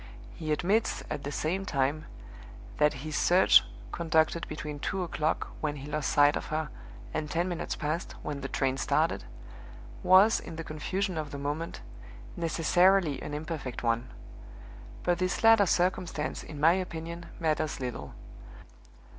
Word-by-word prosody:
He 155 -1 -4
admits, 195 +8 +1
at 145 -2 -3
the 145 - -4
same 175 +6 -1
time, 145 -3 0 0.7
that 150 0 +5
his 155 -1 -4
search 180 +2 +6 0.3
(conducted 160 0 +1
between 150 -1 -6
two 190 +5 -2
o'clock, 160 -2 -1
when 150 -1 -1
he 140 0 -8
lost 150 0 -1
sight 145 0 +5
of - - -4
her, 155 0 -2 0.4
and 150 -1 -2
ten 170 +3 0
minutes 175 -2 -3
past, 155 +3 -3
when 145 -2 -4
the 135 - -3
train 135 0 0
started) - - +1 0.8
was, 190 +4 +6
in 165 - -9
the 165 - -5
confusion 180 +4 -2
of 150 -2 -4
the 140 - -6
moment, 145 +4 -4 0.5
necessarily 170 -1 +3
an 150 - -5
imperfect 150 -5 -5
one. 115 +2 0 0.9
But 175 -1 +1
this 185 +3 -1
latter 225 -3 +7
circumstance, 175 -3 0
in 150 - -9
my 160 +3 +6
opinion, 170 -2 -4
matters 155 -2 0
little. 125 - -5
155 Hz, 145 wpm, -29 LUFS, 150-175 Hz, 0.9 s, latter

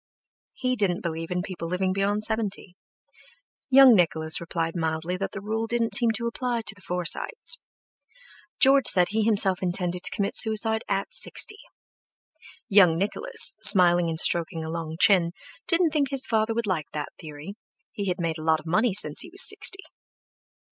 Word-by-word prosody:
He 255 0 -2
didn't 195 -6 -1
believe 165 -1 -5
in 180 0 -3
people 175 -3 -7
living 185 +2 -2
beyond 200 +2 -1
seventy, 210 -4 -2 0.9
Young 270 -1 +7
Nicholas 160 -5 0
replied 165 0 -4
mildly 160 +1 -3
that 195 - -5
the 195 - -8
rule 220 +2 -3
didn't 235 0 -2
seem 235 - +3
to 235 - -4
apply 235 0 -3
to 215 - -1
the 200 - -20
Forsytes. 180 - 0 1.0
George 275 0 +5
said 180 -2 +5
he 220 +2 -1
himself 200 -4 +2
intended 180 -1 -2
to - - 0
commit 200 -1 -3
suicide 220 0 +1
at 195 0 -3
sixty. 420 0 -1 1.1
Young 190 -7 +4
Nicholas, 445 - +1
smiling 175 -5 +5
and 160 -1 -2
stroking 165 -1 +2
a 160 - -6
long 165 -1 -6
chin, 175 -4 +3 0.3
didn't 335 -2 +1
think 285 -3 0
his 270 -1 -2
father 220 0 -1
would 235 0 -2
like 175 -7 -3
that 150 -1 -6
theory; 155 +2 -10 0.4
he 200 -1 -6
had 180 0 -3
made 165 -2 -3
a - - -8
lot 160 0 +1
of 155 - -16
money 210 +5 0
since 150 -7 +3
he 350 - -8
was 385 - +3
sixty. 390 -1 +1
195 Hz, 170 wpm, -24 LUFS, 170-225 Hz, 1.1 s, Young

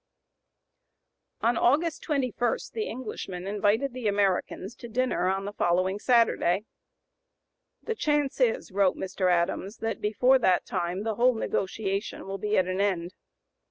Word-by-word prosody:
On 230 +1 +2
August 315 +8 +2
21 255 -5 0 0.2
the 440 -1 -2
Englishmen 195 -7 -6
invited 210 +6 +1
the 250 -3 -3
Americans 200 0 0
to 240 - -9
dinner 245 -5 0
on 195 +1 -1
the 205 - -5
following 185 +2 +1
Saturday. 220 -5 +2 1.2
"The 455 - -2
chance 295 -8 0
is," 230 -4 +1
wrote 195 -1 +2
Mr. 185 -1 0
Adams, 180 +4 0
"that 225 0 -3
before 250 +5 +3
that 185 -6 +2
time 175 +3 -2
the 220 -1 -2
whole 250 +1 +4
negotiation 195 -1 -2
will 195 0 -5
be 210 +1 0
at 185 - +3
an 185 +1 -1
end." 185 -3 -1
205 Hz, 140 wpm, -27 LUFS, 190-245 Hz, 1.2 s, whole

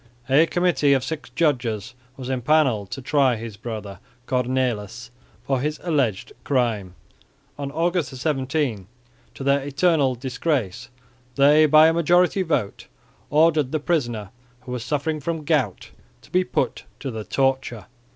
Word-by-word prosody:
A 145 +5 +5
committee 175 -6 +2
of 135 -2 +1
six 155 +3 -5
judges 120 - -1 0.2
were 130 - -7
empanelled 130 -5 +1
to 135 - -6
try 135 -2 +3
his 115 -1 -7
brother 105 -3 -7 0.3
Cornelis 125 -3 -2 0.3
for 135 -1 0
his 150 +2 -2
alleged 135 - -1
crime. 110 -9 -1 0.6
On 140 -1 -3
August 165 -1 0
17, 130 - -1 0.5
to - - -7
their 140 +1 +2
eternal 140 -1 +1
disgrace, 125 - -2 0.5
they 150 +3 +6
by 155 +1 +7
a 165 - +3
majority 175 +3 +3
vote 145 - -2 0.4
ordered 150 -3 +3
the 155 - 0
prisoner, 120 - -2 0.3
who 125 - -9
was 125 -2 -4
suffering 150 +3 -2
from 160 +1 -3
gout, 140 - 0 0.3
to - - -19
be 185 +1 +3
put - - -2
to 135 - -4
the 110 -2 -5
torture. 135 -5 -1
135 Hz, 140 wpm, -23 LUFS, 120-155 Hz, 0.6 s, by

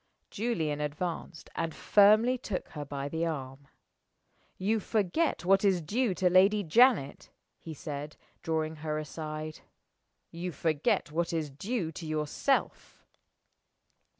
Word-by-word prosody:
Julian 165 -10 -1
advanced, 160 +3 -4
and 165 -1 -3
firmly 215 +5 +5
took 215 -7 -5
her 150 - -6
by 140 -1 -5
the 160 +3 -1
arm. 140 -3 -6 0.9
"You 215 +4 +1
forget 210 - 0
what 195 +2 +4
is 195 -3 +3
due 205 +5 0
to 185 - +2
Lady 195 +3 +5
Janet," 195 - +3 0.3
he 160 -2 -8
said, 145 0 -6 0.2
drawing 160 -1 -2
her 155 0 -3
aside. 155 0 -6 0.7
"You 175 +2 -4
forget 150 0 0
what 170 +2 -1
is 160 -4 -2
due 185 - -3
to 165 +1 -8
yourself." 155 - -1
165 Hz, 125 wpm, -30 LUFS, 150-195 Hz, 0.9 s, firmly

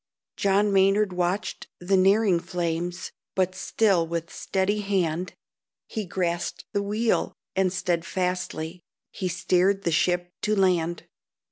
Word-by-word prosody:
John 200 +1 +2
Maynard 195 +1 +4
watched 180 +3 -2
the 185 +2 +1
nearing 195 0 +4
flames, 175 0 -3 0.2
But 185 -1 +1
still 190 -2 +2
with 165 0 -4
steady 195 +2 0
hand 185 -3 -1 0.5
He 215 -2 -4
grasped 175 -1 -2
the 200 - +1
wheel, 215 +3 0 0.2
and 190 -1 +2
steadfastly 180 -2 -2 0.3
He 185 - -3
steered 185 +2 +2
the 170 - +1
ship 175 +2 +1
to 215 0 +1
land. 175 -3 +1
185 Hz, 120 wpm, -26 LUFS, 175-195 Hz, 0.5 s, Maynard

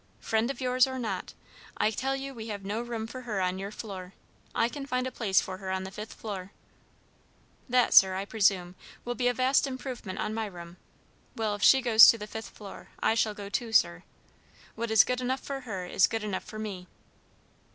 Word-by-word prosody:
"Friend 225 +2 0
of 275 - -4
yours, 255 0 +3
or 260 0 -5
not, 215 -7 -4 0.4
I 215 - +2
tell 270 +5 -1
you 270 0 -5
we 225 -3 -8
have 200 -3 -6
no 210 +4 -2
room 235 -2 -4
for 255 +3 -8
her 220 -5 -3
on 185 0 -1
your 195 +1 -4
floor. 195 -4 -8 0.4
I 230 - +3
can 275 +2 -7
find 255 -1 -1
a 260 - -3
place 200 -6 +2
for 185 0 -5
her 190 -2 -6
on 190 0 -2
the 190 - -7
fifth 210 +2 -8
floor." 195 -3 -7 1.2
"That, 250 0 +3
sir, 190 -1 +7
I 195 +1 -3
presume, 195 -4 +1 0.3
will 245 - -2
be 245 0 0
a 245 - +3
vast 260 +3 +3
improvement 255 -7 -6
on 215 - -2
my 220 -1 -2
room. 175 -2 -10 0.6
Well, 220 -3 -1
if 205 - -6
she 265 +5 +6
goes 225 -2 +9
to 230 - +6
the 210 - -6
fifth 220 +1 -7
floor, 200 -2 -11
I - - +2
shall 220 -2 +1
go 205 -1 -7
too, 225 +3 -3
sir. 85 - +3 0.7
What 235 +1 -4
is 220 -2 +7
good 250 0 -2
enough 260 +1 -1
for 275 -1 -5
her 205 -8 -5
is 180 - +3
good 225 -1 -3
enough 205 -3 -3
for 215 - -9
me." 200 -4 -6
220 Hz, 215 wpm, -28 LUFS, 195-245 Hz, 1.2 s, goes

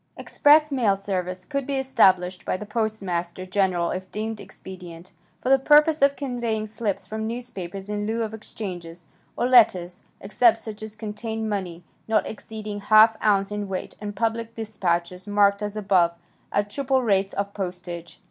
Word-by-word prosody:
"Express 300 +1 +4
mail 225 -8 +2
service" 185 -2 -3
could 280 -3 -3
be 280 - -1
established 185 -9 +3
by - - -1
the 210 - -7
Postmaster 195 -5 -2
General 185 -3 +1
if 185 0 -5
deemed 220 0 -4
expedient, 180 -4 -11 0.3
for 255 - 0
the 270 0 +6
purpose 300 +2 +5
of 280 0 +4
conveying 240 -5 -2
slips 210 -3 -3
from 220 +3 -4
newspapers 200 -6 -6
in 210 0 -3
lieu 225 +1 -1
of 220 -1 -5
exchanges, 175 -6 -7 0.3
or - - +1
letters, 195 -7 +4 0.2
except 225 +3 +3
such 220 -1 -8
as 215 0 -7
contained 220 +1 -4
money, 185 -5 -4 0.2
not 220 -1 +2
exceeding 215 -1 -6
½ 215 +2 +6
ounce 200 -2 +2
in 205 -1 -3
weight, 190 -1 -5
and 205 -1 -5
public 230 0 -2
dispatches, 185 -4 -2
marked 205 0 +3
as 210 0 -4
above, 185 -4 +2 0.4
at 205 0 0
triple 265 +1 +1
rates 195 -3 +1
of 200 0 -3
postage. 180 -3 -6
210 Hz, 160 wpm, -24 LUFS, 185-225 Hz, 0.4 s, the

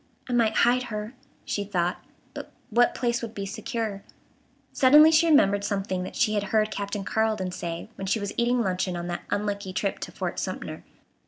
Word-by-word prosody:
"I 250 - -3
might 225 -2 +2
hide 250 +1 +2
her," 215 +1 -5 0.3
she 205 - -2
thought; 180 -3 -1 0.3
but - - -8 0.2
what 240 +2 +3
place 240 -1 0
would 230 -2 -6
be 200 - -4
secure? 215 0 -4 0.7
Suddenly 300 +4 +7
she 325 +1 +4
remembered 200 -10 +4
something 195 -2 -2
that 180 - -6
she 230 -4 +2
had 205 -1 0
heard 215 +1 +1
Captain 200 0 -3
Carleton 215 -3 0
say 170 -2 -5
when 195 - -6
she 220 - +1
was 205 -1 -4
eating 240 +1 +2
luncheon 185 -1 -1
on 175 - -4
that 175 - -3
unlucky 200 -2 -2
trip 195 +1 -1
to - - -6
Fort - - -4
Sumter. - - -5
210 Hz, 185 wpm, -26 LUFS, 195-235 Hz, 0.7 s, Suddenly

